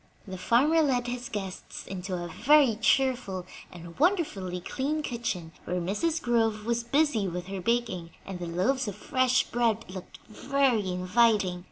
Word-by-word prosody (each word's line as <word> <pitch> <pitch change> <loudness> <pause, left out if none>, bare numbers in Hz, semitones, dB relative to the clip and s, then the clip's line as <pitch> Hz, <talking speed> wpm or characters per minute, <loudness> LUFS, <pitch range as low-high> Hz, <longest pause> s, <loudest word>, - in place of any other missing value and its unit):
The 190 - -6
farmer 285 - +3
led 255 -5 +1
his 245 0 -4
guests 195 -4 -6
into 185 0 -5
a 175 -1 -4
very 250 - +4
cheerful 235 -5 +1 0.3
and 170 -1 -11
wonderfully 285 - +1
clean 290 - -2
kitchen, 225 - -3
where 180 0 -1
Mrs. 255 - -1
Groves 225 -5 +1
was 235 0 0
busy 245 -5 +2
with 180 0 -4
her 190 0 -5
baking, 230 -6 -1 0.2
and 190 -2 -6
the 175 - -4
loaves 215 +10 0
of 205 - -4
fresh 255 -2 +2
bread 230 -2 0
looked 185 -2 -9
very 250 -3 +1
inviting. 185 0 +2
225 Hz, 155 wpm, -28 LUFS, 185-255 Hz, 0.3 s, very